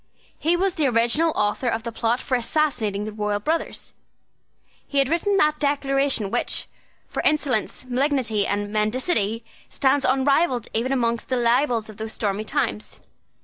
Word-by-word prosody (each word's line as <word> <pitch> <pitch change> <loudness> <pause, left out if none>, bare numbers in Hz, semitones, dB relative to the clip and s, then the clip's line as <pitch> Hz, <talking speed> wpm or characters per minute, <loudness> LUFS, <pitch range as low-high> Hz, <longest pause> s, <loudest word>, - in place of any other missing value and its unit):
He 335 +3 +2
was 380 +1 +1
the 310 -6 +1
original 240 +7 +2
author 210 +4 0
of 225 -1 -1
the 235 - -4
plot 230 +2 0
for 260 - -1
assassinating 235 -6 0
the 215 - -5
royal 210 -1 -2
brothers. 320 +10 -3 0.9
He 285 - -4
had 275 -1 +3
written 390 +5 +1
that 305 -4 +2
Declaration 275 -6 +1
which, - - -1 0.4
for - - -3
insolence, 265 -6 0
malignity, 255 -5 0
and 205 +1 -2
mendacity, 220 - 0 0.2
stands 275 +1 +1
unrivalled 265 -1 +2
even 240 +4 0
among 235 -3 +1
the 255 - 0
libels 240 -1 +2
of 215 -2 -11
those 220 0 -5
stormy 205 0 -2
times. 245 -5 -2
250 Hz, 150 wpm, -23 LUFS, 220-285 Hz, 0.9 s, had